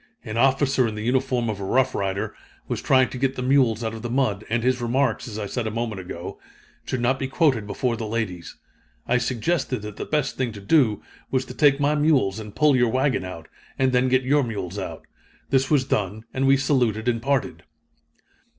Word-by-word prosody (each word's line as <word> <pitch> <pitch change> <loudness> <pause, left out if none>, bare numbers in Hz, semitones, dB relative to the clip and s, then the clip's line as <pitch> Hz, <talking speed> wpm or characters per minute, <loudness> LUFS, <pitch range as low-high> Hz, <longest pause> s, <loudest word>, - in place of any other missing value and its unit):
An 110 - -5
officer 135 +1 +3
in 110 - -4
the 105 - -5
uniform 125 0 0
of 105 -3 -3
a - - -5
Rough 130 +6 +2
Rider 95 0 -2 0.3
was - - -3
trying 130 -1 +4
to 130 - -7
get 135 0 0
the 125 - -3
mules 125 -4 +3
out 110 0 -2
of 110 - -7
the 120 - -4
mud, 115 -5 0
and 115 0 0
his 130 0 +1
remarks, 130 +4 0
as 110 -2 -6
I 105 - -3
said 115 +3 -3
a - - 0
moment 110 -3 -3
ago, 90 -1 -7 0.5
should 130 - -2
not 130 +2 +1
be 135 - -2
quoted 135 - +1
before 120 +3 -1
the 115 -1 -4
ladies. 105 -6 -4 0.5
I 125 +1 +3
suggested 130 0 -1
that 105 -1 -7
the - - -4
best 150 -3 -1
thing 125 -4 -1
to 105 - -9
do, 105 0 +2 0.3
was 130 0 0
to - - -9
take 145 -2 +4
my 145 +1 +2
mules 145 -10 +2
and 105 -2 -9
pull 150 -2 +4
your 120 -2 +3
wagon 130 -1 +1
out, 90 -3 -8 0.3
and 130 -1 +2
then 125 +1 +2
get 130 +1 +3
your 145 +3 +3
mules 100 -5 -4
out. 95 - -6 0.5
This 135 0 +2
was 145 -4 +3
done, 105 -2 -1
and 135 +1 +1
we 135 0 +6
saluted 125 -5 +1
and 115 -2 +1
parted." 135 +1 -1
125 Hz, 215 wpm, -24 LUFS, 110-135 Hz, 0.5 s, we